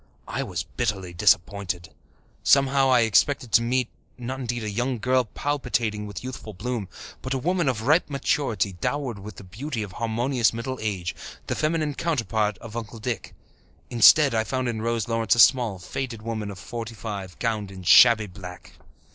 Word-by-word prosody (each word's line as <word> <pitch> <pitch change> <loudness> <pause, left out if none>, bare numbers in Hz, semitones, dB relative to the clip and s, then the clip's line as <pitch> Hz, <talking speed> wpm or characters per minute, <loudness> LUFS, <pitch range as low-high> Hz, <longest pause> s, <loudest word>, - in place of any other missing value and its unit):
I - - -3
was - - -3
bitterly 100 -7 -3
disappointed. 95 -2 +1 0.5
Somehow, 135 -1 +4
I 125 -2 +5
had 115 - +3
expected 125 +3 +2
to - - +5
meet, 125 +1 0 0.3
not 130 +2 -5
indeed 120 -2 -3
a 105 - -3
young 120 +4 -1
girl 130 +2 +2
palpitating 115 -5 -2
with 100 0 -7
youthful 120 -5 -7
bloom, 115 -1 -4 0.3
but 130 +1 -3
a - - +1
woman 170 +2 +1
of 110 -4 -2
ripe 150 +7 +3
maturity, 135 -8 0
dowered 125 +3 -3
with 100 0 -9
the 95 - -11
beauty 115 +5 -5
of 100 - -8
harmonious 115 +3 0
middle 120 +2 -4
age 95 -5 -2 0.3
the - - -2
feminine 155 -1 0
counterpart 110 - -1
of 115 -1 -11
Uncle 115 0 -6
Dick. 115 -2 -5 0.6
Instead, 135 +4 +7
I 110 -1 +2
found 130 +2 -2
in 115 -2 -2
Rose 115 -1 -1
Lawrence 115 -1 +2
a - - -2
small, 120 -5 +5
faded 115 +5 -5
woman 110 -2 -4
of 100 - -8
forty 115 +5 -7
five, 100 -5 -6
gowned 110 -4 -2
in 95 -1 -10
shabby 110 +4 +7
black. 90 -2 -11
115 Hz, 175 wpm, -25 LUFS, 105-130 Hz, 0.6 s, Instead